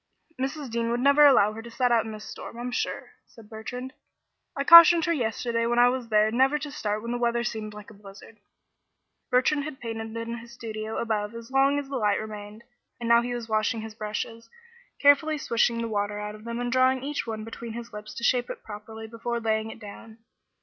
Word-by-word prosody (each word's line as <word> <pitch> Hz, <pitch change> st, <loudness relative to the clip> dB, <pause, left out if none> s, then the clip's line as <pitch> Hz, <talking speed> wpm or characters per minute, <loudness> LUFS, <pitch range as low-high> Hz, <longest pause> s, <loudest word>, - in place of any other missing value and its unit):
"Mrs. 275 Hz, -1 st, -3 dB
Dean 230 Hz, 0 st, -1 dB
would 240 Hz, +1 st, 0 dB
never 280 Hz, +3 st, +6 dB
allow 215 Hz, -6 st, +5 dB
her 225 Hz, -, -7 dB
to 235 Hz, -, -10 dB
set 245 Hz, +1 st, 0 dB
out 230 Hz, -1 st, +3 dB
in 220 Hz, -, -6 dB
this 215 Hz, 0 st, -9 dB
storm, -, -, -9 dB
I'm 245 Hz, +1 st, -4 dB
sure," -, -, -3 dB, 0.2 s
said 220 Hz, -1 st, -17 dB
Bertrand. 250 Hz, +4 st, -7 dB, 0.6 s
"I 275 Hz, -, 0 dB
cautioned 335 Hz, +1 st, +9 dB
her 340 Hz, -, +1 dB
yesterday 230 Hz, -3 st, -1 dB
when 240 Hz, 0 st, 0 dB
I 245 Hz, 0 st, +6 dB
was 250 Hz, -1 st, -3 dB
there 215 Hz, 0 st, +3 dB
never 265 Hz, +5 st, +3 dB
to 295 Hz, 0 st, -6 dB
start 210 Hz, -5 st, -3 dB
when 235 Hz, -, -4 dB
the 245 Hz, -, -2 dB
weather 235 Hz, 0 st, +1 dB
seemed 215 Hz, -3 st, -4 dB
like 210 Hz, +2 st, -11 dB
a -, -, -13 dB
blizzard." 205 Hz, +2 st, -14 dB, 0.9 s
Bertrand 280 Hz, +3 st, +2 dB
had 295 Hz, -2 st, -7 dB
painted 225 Hz, -1 st, -6 dB
in 230 Hz, +1 st, -4 dB
his 235 Hz, +1 st, -13 dB
studio 220 Hz, -2 st, -6 dB
above 215 Hz, -1 st, -2 dB
as 230 Hz, +2 st, -10 dB
long 275 Hz, +1 st, +3 dB
as 285 Hz, -1 st, -3 dB
the 275 Hz, -1 st, -3 dB
light 210 Hz, -3 st, +1 dB
remained, 210 Hz, 0 st, -8 dB, 0.4 s
and 235 Hz, -, -4 dB
now 235 Hz, 0 st, +6 dB
he 245 Hz, 0 st, -3 dB
was 235 Hz, -2 st, -6 dB
washing 220 Hz, +1 st, 0 dB
his 220 Hz, 0 st, -8 dB
brushes, 225 Hz, +1 st, -5 dB, 0.5 s
carefully 285 Hz, +2 st, +4 dB
swishing 235 Hz, -3 st, +1 dB
the -, -, -2 dB
water 205 Hz, -1 st, -2 dB
out 210 Hz, 0 st, -5 dB
of 215 Hz, +1 st, -13 dB
them 235 Hz, 0 st, -4 dB
and 245 Hz, 0 st, -2 dB
drawing 260 Hz, 0 st, +3 dB
each 290 Hz, -2 st, -3 dB
one 220 Hz, -1 st, -4 dB
between 225 Hz, +1 st, -8 dB
his 235 Hz, 0 st, -8 dB
lips 210 Hz, 0 st, -9 dB
to 235 Hz, -, -7 dB
shape 245 Hz, 0 st, +2 dB
it -, -, -7 dB
properly 220 Hz, +1 st, -9 dB
before 235 Hz, +1 st, -4 dB
laying 220 Hz, -1 st, -1 dB
it -, -, -9 dB
down. 220 Hz, +1 st, -11 dB
230 Hz, 220 wpm, -26 LUFS, 220-250 Hz, 0.9 s, cautioned